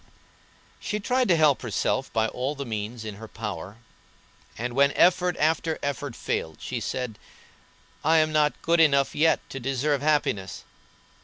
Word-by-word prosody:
She 210 - -3
tried 250 +4 +1
to 180 - +4
help 155 -4 +3
herself 130 +3 -1
by 110 0 +1
all 130 +6 -3
the 140 0 -5
means 110 0 -5
in 105 -2 -6
her 110 +1 -9
power, 105 -3 -6 0.8
and 120 +2 -3
when 140 +2 +4
effort 180 -1 +3
after 160 +1 +1
effort 145 -3 -3
failed 80 -1 -3
she - - -4
said: 125 -5 -4 0.8
"I 160 +2 +4
am 155 0 +3
not 150 -1 +2
good 170 +1 +3
enough 140 -4 +4
yet 160 +2 +2
to 135 - -5
deserve 135 +2 0
happiness. 145 -10 0
140 Hz, 155 wpm, -26 LUFS, 115-155 Hz, 0.8 s, to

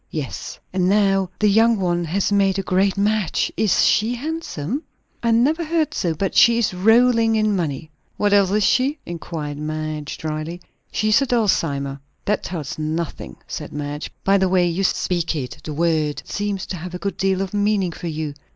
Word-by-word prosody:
"Yes." 150 -5 -5 0.2
"And 185 -1 +2
now 195 -2 +3
the 210 - +2
young 225 +3 +4
one 175 -2 0
has 190 +5 0
made 195 -1 +3
a 195 - -1
great 190 +1 +1
match? 205 -3 +1
Is 210 -4 +3
she 225 +3 +2
handsome?" 280 - -4 0.4
"I 235 - +1
never 270 +9 +3
heard 320 -2 0
so. 170 -4 -1
But 195 +4 -2
she 235 -1 +6
is 235 -5 +1
rolling 225 +3 +4
in 215 -1 +2
money." 155 -3 -3 0.3
"What 205 -1 +2
else 200 -2 +5
is 210 +2 +2
she?" 265 +8 +2
inquired 155 -3 -5
Madge 155 -1 -4
dryly. 155 +2 -4 0.3
"She 215 - 0
is 215 +5 +5
a 275 - 0
Dulcimer." 145 - 0 0.3
"That 210 0 +1
tells 155 -4 -5
me 155 - -2
nothing," 160 +1 -4
said - - -6
Madge. 145 0 -4
"By 195 +1 +4
the 190 -1 +2
way 180 -1 +3
you 175 +3 -1
speak 175 -3 0
it, 140 0 -5
the 155 - -5
word 155 -2 0
seems 205 -2 -3
to 185 - -5
have 180 +2 -7
a - - -2
good 200 +3 -4
deal 190 -1 +1
of 195 - -7
meaning 205 -3 +1
for 170 - -7
you." 155 -2 -3
190 Hz, 190 wpm, -21 LUFS, 160-215 Hz, 0.4 s, she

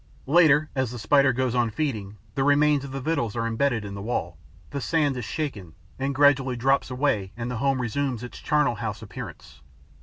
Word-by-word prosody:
Later, 155 0 +4
as 130 -3 0
the 120 - -7
Spider 135 +4 +4
goes 125 0 -1
on 120 -2 +2
feeding, 105 -6 -3 0.2
the 135 - 0
remains 145 0 +3
of 140 - -7
the 135 - -4
victuals 135 -7 -1
are 115 -1 -1
embedded 115 -1 0
in 100 - -6
the 100 - -6
wall, 95 -6 -3 0.4
the 140 -1 -3
sand 150 -2 +1
is 125 -3 -4
shaken 105 - -4 0.2
and 135 +1 -1
gradually 135 -2 +4
drops 135 +4 +1
away 125 -7 0
and 120 +1 -4
the 125 - -3
home 135 +2 +1
resumes 125 0 -2
its 125 - -8
charnel 150 -4 +2
house - - -4
appearance. 70 - -9
130 Hz, 195 wpm, -25 LUFS, 115-145 Hz, 0.4 s, Later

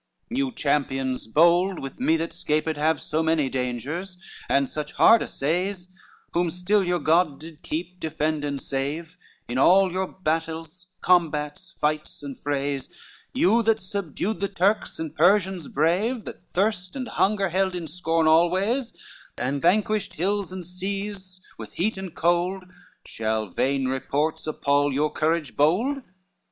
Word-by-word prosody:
XC 245 - -2
"You 275 -2 0
champions 135 - -1
bold, 170 +8 +4
with 135 - -7
me 165 -10 +3
that 165 +1 -3
'scaped 155 -1 -1
have 155 +1 +1
So 155 +1 -1
many 160 -4 +1
dangers, 135 +10 -3 0.3
and 140 0 +3
such 150 +1 -5
hard 230 - +6
assays, 180 +5 -2 0.4
Whom 175 0 +1
still 180 +4 +1
your 180 -1 +1
God 160 -2 +2
did 160 -1 -12
keep, 175 +3 -5
defend 155 -1 -1
and 140 -1 -2
save 145 +5 -4 0.3
In 120 +2 -2
all 190 +5 +5
your 190 +1 -1
battles, 165 0 -3 0.2
combats, 160 -1 +1
fights 150 0 -2
and 140 -2 -6
frays, 140 -1 -2 0.4
You 220 +6 +3
that 225 -1 +2
subdued 195 +1 -3
the 200 - 0
Turks 200 +2 0
and 160 -1 -5
Persians 185 0 +3
brave, 190 - +1
That - - -10
thirst 185 -1 -1
and 255 -2 -4
hunger 195 -1 +1
held 190 +1 0
in 175 -2 -4
scorn 165 0 0
always, 185 +10 +2 0.4
And 140 +2 -1
vanquished 210 +3 +1
hills, 195 +3 -1
and 185 -2 -6
seas, 190 +1 -5 0.2
with - - -8
heat 210 +6 0
and 190 -3 -7
cold, 175 +3 +1 0.4
Shall 110 -2 -2
vain 135 +5 0
reports 145 +5 -1
appal 145 -1 +1
your 150 +3 +1
courage 160 -1 0
bold? 220 - +2
170 Hz, 145 wpm, -25 LUFS, 150-190 Hz, 0.4 s, hard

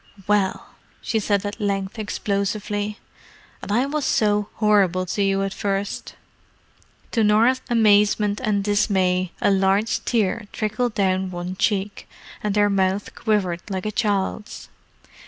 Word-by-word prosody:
"Well!" 205 -2 0 0.3
she 225 - -1
said 205 -1 0
at 205 - -5
length 200 +1 -2
explosively. 205 0 -2 0.6
"And - - -6
I 240 +5 +2
was 295 +1 -2
so 210 -3 +1
horrible 195 -4 +2
to 195 +3 -2
you 195 0 +1
at 195 0 -3
first!" 200 0 -3 1.0
To 225 - +2
Norah's 230 +5 +4
amazement 210 -2 +3
and 205 -3 +1
dismay 185 -3 +1
a - - +3
large 195 +3 +1
tear 215 -2 0
trickled 215 +2 -2
down 190 -1 +1
one 180 +1 -5
cheek, 200 0 -1 0.3
and 210 -1 -1
her 205 0 +4
mouth 195 0 0
quivered 190 -6 0
like 190 -1 -3
a 215 - -1
child's. 210 -2 -2
205 Hz, 135 wpm, -22 LUFS, 195-215 Hz, 1.0 s, Norah's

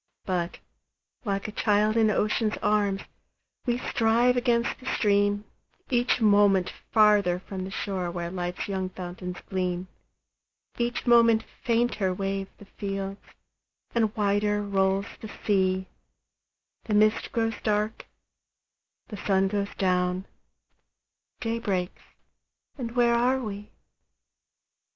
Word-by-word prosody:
But, 180 -3 -2 0.7
like 200 -1 -1
a - - -5
child 210 0 +2
in 220 -1 +4
ocean's 215 +1 +1
arms, 205 -2 +1 0.6
We 240 0 +2
strive 240 +1 +2
against 240 -1 +1
the 255 - -11
stream, 205 -1 +2 0.5
Each 245 0 +2
moment 205 -4 +4 0.2
farther 210 -5 +5
from 185 0 -6
the - - -6
shore 190 -3 -3
Where 170 0 -4
life's 180 -1 -3
young 190 -2 -2
fountains 180 0 -7
gleam; 180 -1 -2 0.9
Each 240 +1 -1
moment 230 -2 +5 0.2
fainter 230 -5 +1
wave 195 0 -2
the 205 - -13
fields, 195 -1 -5 0.7
And 220 -3 +1
wider 205 0 +1
rolls 195 0 +1
the 220 - -8 0.2
sea; 190 -2 +2 1.0
The 215 - 0
mist 215 +1 +3
grows 225 -1 -1
dark, 210 0 -1 1.0
the 210 - -6
sun 195 0 +2
goes 200 0 -1
down, 180 0 +1 1.2
Day 230 0 -1
breaks, 185 -5 -2 0.7
and 235 -3 -5
where 240 -1 +4
are 250 +3 +3
we? 210 -3 -6
205 Hz, 115 wpm, -27 LUFS, 190-225 Hz, 1.2 s, farther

